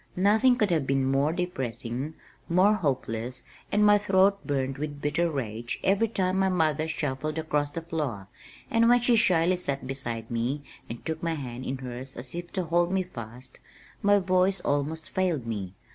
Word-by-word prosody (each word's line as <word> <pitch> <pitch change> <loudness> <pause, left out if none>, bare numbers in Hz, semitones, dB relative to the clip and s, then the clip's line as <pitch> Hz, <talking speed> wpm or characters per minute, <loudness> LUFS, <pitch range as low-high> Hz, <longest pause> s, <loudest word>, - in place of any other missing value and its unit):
Nothing 220 +7 +4
could 210 -6 +1
have 155 -5 +1
been 135 0 +2
more 135 +3 +2
depressing, 135 -4 -3 0.3
more 185 +5 +5
hopeless, 130 - -2 0.3
and 210 +1 +4
my 205 0 +6
throat 195 0 +3
burned 135 -1 -1
with 145 -1 -4
bitter 150 +4 +1
rage 120 -4 -4
every 200 +4 +3
time 190 -3 0
my 190 0 +3
mother 160 -3 +1
shuffled 150 0 -2
across 150 -2 0
the 165 +3 -6
floor, 145 - -3 0.4
and 230 -1 +4
when 245 0 +6
she 245 0 +3
shyly 180 -5 +3
sat 140 -6 -2
beside 120 -4 -3
me 125 +5 -1 0.3
and 115 +1 -7
took 160 0 -3
my 165 -1 -1
hand 130 -3 -6
in 130 - -2
hers 130 +1 -7
as 125 +1 -8
if 175 0 -6
to 185 - 0
hold 170 +1 +1
me 190 0 +1
fast, 125 -6 -9 0.4
my 205 0 +5
voice 185 0 +2
almost 145 +3 -1
failed 175 -9 0
me. 100 -5 -4
155 Hz, 175 wpm, -27 LUFS, 130-185 Hz, 0.4 s, my